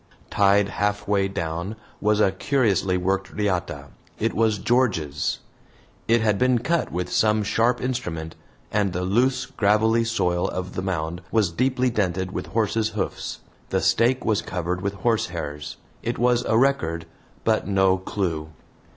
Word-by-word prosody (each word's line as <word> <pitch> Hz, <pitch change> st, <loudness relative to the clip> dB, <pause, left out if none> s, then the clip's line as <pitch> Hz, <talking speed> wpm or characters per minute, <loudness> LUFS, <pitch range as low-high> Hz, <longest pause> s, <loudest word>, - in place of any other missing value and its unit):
Tied 100 Hz, 0 st, +4 dB
halfway 105 Hz, -1 st, 0 dB
down 85 Hz, +2 st, -4 dB, 0.3 s
was 105 Hz, 0 st, +2 dB
a 100 Hz, -3 st, +4 dB
curiously 100 Hz, -, +1 dB
worked 95 Hz, +2 st, -1 dB
riata. 90 Hz, -9 st, -2 dB, 0.3 s
It -, -, 0 dB
was 110 Hz, -1 st, +2 dB
George's. 95 Hz, -, 0 dB, 0.7 s
It 115 Hz, 0 st, +4 dB
had 105 Hz, -3 st, +2 dB
been 125 Hz, -1 st, +3 dB
cut 165 Hz, +8 st, 0 dB
with 90 Hz, 0 st, -3 dB
some 110 Hz, -1 st, +3 dB
sharp 115 Hz, +4 st, +2 dB
instrument, 90 Hz, -11 st, -3 dB, 0.4 s
and 100 Hz, -3 st, +1 dB
the 90 Hz, 0 st, -2 dB
loose 125 Hz, +7 st, +2 dB
gravelly 110 Hz, -2 st, +2 dB
soil 90 Hz, -6 st, 0 dB
of 95 Hz, 0 st, -5 dB
the -, -, -3 dB
mound 85 Hz, -2 st, -3 dB
was 105 Hz, -6 st, +2 dB
deeply 125 Hz, +5 st, +1 dB
dented 95 Hz, -3 st, -1 dB
with -, -, -4 dB
horses' 110 Hz, 0 st, 0 dB
hoofs. 95 Hz, -, -3 dB, 0.3 s
The -, -, +1 dB
stake 125 Hz, +3 st, +2 dB
was 110 Hz, -2 st, +2 dB
covered 90 Hz, 0 st, -3 dB
with 100 Hz, 0 st, -2 dB
horsehairs. 85 Hz, -9 st, -2 dB, 0.2 s
It 120 Hz, +1 st, -2 dB
was 125 Hz, 0 st, +2 dB
a 110 Hz, -, +2 dB
record, 85 Hz, -11 st, +1 dB, 0.4 s
but -, -, +1 dB
no 95 Hz, -1 st, +3 dB
clue. 85 Hz, -5 st, -3 dB
100 Hz, 145 wpm, -24 LUFS, 90-115 Hz, 0.7 s, Tied